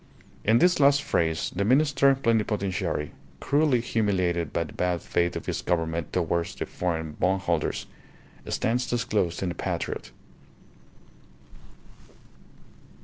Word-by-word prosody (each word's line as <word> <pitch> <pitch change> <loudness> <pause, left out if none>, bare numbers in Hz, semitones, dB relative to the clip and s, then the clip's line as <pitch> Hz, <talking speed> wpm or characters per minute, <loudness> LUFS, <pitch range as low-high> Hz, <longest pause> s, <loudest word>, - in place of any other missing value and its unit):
In 110 +2 +4
this 175 +4 +4
last 140 0 +5
phrase 80 -1 0
the 100 - 0
Minister 140 +3 +4
Plenipotentiary, 105 - -1 0.3
cruelly 145 -4 +2
humiliated 95 -8 0
by 85 - 0
the 75 - -11
bad 90 -1 -1
faith 85 0 0
of - - -5
his - - -2
Government 80 -2 -1
towards 85 -1 -1
the - - -4
foreign 80 -3 -3
bondholders, 90 -4 0 0.6
stands 120 +1 0
disclosed 110 -8 0
in 90 - -1
the - - -3
patriot. - - -4
95 Hz, 115 wpm, -26 LUFS, 85-120 Hz, 0.6 s, last